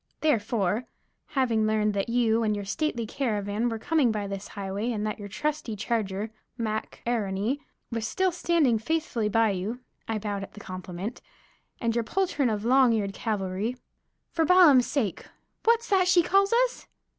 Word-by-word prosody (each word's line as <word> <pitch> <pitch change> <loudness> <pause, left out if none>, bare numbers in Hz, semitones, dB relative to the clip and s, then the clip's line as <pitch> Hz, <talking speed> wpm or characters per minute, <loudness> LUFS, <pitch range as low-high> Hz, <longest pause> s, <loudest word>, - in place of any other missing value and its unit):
Therefore, 225 - +1 0.5
having 230 -5 +2
learned 215 -1 +2
that 200 +3 -1
you 230 -1 +2
and 215 -2 +1
your 205 -1 -4
stately 240 +2 -1
caravan 215 -2 -1
were 225 - -3
coming 290 0 +2
by 210 -2 -2
this 195 0 -5
highway 200 +3 -3
and 215 -2 -2
that 215 0 -3
your 205 - -6
trusty 285 +1 -2
charger, 210 -1 -2 0.3
Mac 220 -2 -3
A'Rony, 220 +2 0 0.3
was 230 -1 -2
still 375 - +1
standing 330 -9 +2
faithfully 240 -4 -1
by 225 0 +3
you" 200 +6 -3 0.3
(I 225 - -1
bowed 205 -1 -3
at 195 - -8
the - - -11
compliment) 185 +3 -6 0.6
"and 230 -2 0
your 235 0 +1
poultroon 295 -2 0
of 215 0 -2
long 255 -1 +5
eared 200 -3 -1
cavalry" 205 +3 -2 0.5
"For 330 - +1
Balaam's 320 -7 +6
sake! 225 - -2 0.4
What's 465 +1 +3
that 380 -3 +4
she 360 -1 +5
calls 395 +3 +3
us?" - - +1
225 Hz, 165 wpm, -27 LUFS, 205-275 Hz, 0.6 s, Balaam's